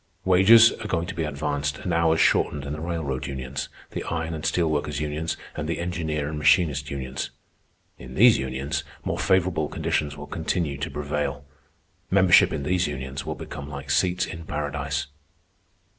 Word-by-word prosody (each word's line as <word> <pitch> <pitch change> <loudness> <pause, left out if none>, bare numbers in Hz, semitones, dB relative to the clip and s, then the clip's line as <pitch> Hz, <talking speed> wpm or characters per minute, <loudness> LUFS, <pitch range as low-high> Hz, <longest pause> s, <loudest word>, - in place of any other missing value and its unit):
Wages 100 +5 +7
are 110 - -4
going 85 -4 0
to - - -5
be 80 - -2
advanced 70 -1 -2
and 90 - -3
hours 80 -1 +3
shortened 70 -2 +2
in 70 - -4
the 75 - -6
railroad 80 -7 -3
unions, 65 0 -5 0.2
the - - -4
iron 80 0 -2
and 80 -1 -5
steel 85 +1 +1
workers 75 -2 -1
unions, 75 +2 -2 0.2
and 80 0 -4
the 85 - -1
engineer 80 -4 -2
and 75 0 -4
machinist 75 -1 +3
unions. 65 -1 -4 0.7
In - - -10
these - - +6
unions 65 +2 -2 0.2
more - - -2
favorable 90 -4 +2
conditions 75 0 -1
will 75 - -7
continue 80 -3 -2
to 70 - -3
prevail. 70 -1 -3 0.6
Membership 95 -2 +6
in 70 - -3
these 90 +4 +1
unions 65 -1 -5
will - - -2
become 70 0 -8
like 70 -1 -6
seats 90 +5 +2
in 80 - -7
Paradise." 75 -1 -2
75 Hz, 170 wpm, -25 LUFS, 70-85 Hz, 0.7 s, Wages